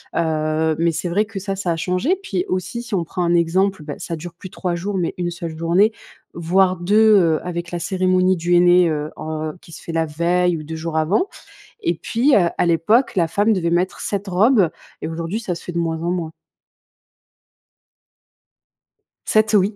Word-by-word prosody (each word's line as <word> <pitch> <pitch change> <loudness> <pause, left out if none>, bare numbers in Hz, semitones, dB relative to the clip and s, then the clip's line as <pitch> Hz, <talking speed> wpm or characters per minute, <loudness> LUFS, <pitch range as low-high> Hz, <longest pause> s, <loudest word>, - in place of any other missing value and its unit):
Heu, 155 -1 0
mais 170 0 +2
c'est 175 - -3
vrai 205 +5 +1
que 215 -1 -10
ça 195 0 -4
ça 185 -3 -1
a - - 0
changé, 180 - 0
puis 185 - -2
aussi, 185 +6 -3
si 235 -3 -4
on 175 - 0
prend 175 +2 -5
un 170 - +2
exemple, 180 +1 +1
bah, 145 -1 -6
ça 165 - -5
dure 170 +2 -8
plus 185 +2 -10
3 180 -1 -3
jours 195 +3 -3
mais 175 -2 -1
une 175 -1 -2
seule 170 -2 -6
journée, 175 +6 +3 0.4
voire 185 +2 +2
2, 210 +4 +4
heu, 165 -4 +2
avec 170 -1 -4
la 175 - -3
cérémonie 185 0 +1
du 175 +1 0
henné, 175 0 +5
heu 150 -1 -2
heu, 155 0 -4
qui 165 - -15
se - - -10
fait - - -6
la 165 0 0
veille 170 +3 +1
ou 155 - -7
2 160 +2 -6
jours 160 0 -5
avant. 175 - +1 0.5
Et 170 - +1
puis, 240 - +1
heu, 175 -4 +4
à - - +2
l'époque, 175 +10 +2
la 170 -3 +2
femme 205 +6 +2
devait 175 -4 0
mettre 175 +2 0
7 200 0 -3
robes 195 0 +4 0.3
et - - -3
aujourd'hui 165 +5 -3
ça 205 -6 -3
se - - -10
fait - - -6
de 170 - -5
moins 165 -1 -1
en 170 - -1
moins. 170 -3 -3 2.9
7 215 0 +2
oui! 205 +1 +3
175 Hz, 205 wpm, -20 LUFS, 165-195 Hz, 2.9 s, henné